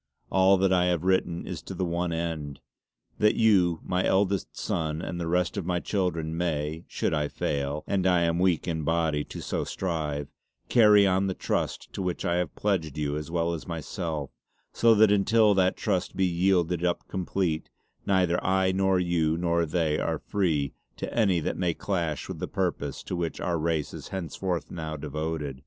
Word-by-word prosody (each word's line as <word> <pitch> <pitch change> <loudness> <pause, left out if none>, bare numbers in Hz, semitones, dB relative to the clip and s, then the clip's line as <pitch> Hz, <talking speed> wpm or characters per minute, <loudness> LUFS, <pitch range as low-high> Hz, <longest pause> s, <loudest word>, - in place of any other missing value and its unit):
All 95 +1 +5
that 95 0 +3
I 90 -1 +3
have 90 -2 +1
written 90 -2 +1
is - - -5
to 95 - -8
the 90 +1 -1
one 85 0 -1
end 80 -4 -3 0.6
that 105 0 +4
you 95 -7 +4
my 90 +1 0
eldest 100 0 +1
sonne 80 -2 -2
and 85 +1 -4
the 85 - -2
rest 90 +4 0
of 95 - -2
my 90 -1 +1
children, 85 -5 -1
may, 80 -1 -2
should - - -1
I 75 -1 +1
fail 70 +1 -2
and 95 -2 +1
I 90 -2 +4
am 85 0 +1
weak 90 -2 +2
in 80 -2 -1
bodie 80 -1 +1
to - - -8
so - - -2
strive 75 -6 -3 0.4
carry 105 -4 +6
on 95 0 +2
the 95 - -2
Trust - - -2
to - - -4
which 90 -2 -2
I 85 - +1
have 90 -3 -2
pledged 85 -8 -1
you 75 -1 -1
as 75 +1 -5
well 85 0 0
as 80 - -6
myself; 80 -3 -4 0.4
so 115 -1 +5
that 110 -1 +6
untill 105 +1 +4
that 95 -1 +2
Trust 95 -5 -1
be 95 - +2
yielded 90 -1 +1
up 90 -1 -1
complete, 90 -3 -2 0.3
neither 90 -3 +2
I 95 0 +2
nor 95 0 +2
you 85 -3 +1
nor 85 -1 +1
they 80 -2 0
are - - -1
free 80 -9 -1 0.2
to - - -5
any 100 -7 +3
that - - -2
may 90 -2 0
clash 85 -7 -2
with - - -6
the - - -3
purpose 70 -2 -2
to - - -4
which 85 -2 -3
our 85 -2 -1
race 80 -2 -1
is - - -8
henceforth 90 -2 -3
now 80 -2 -5
devoted. 75 -2 -4
85 Hz, 190 wpm, -27 LUFS, 80-95 Hz, 0.6 s, carry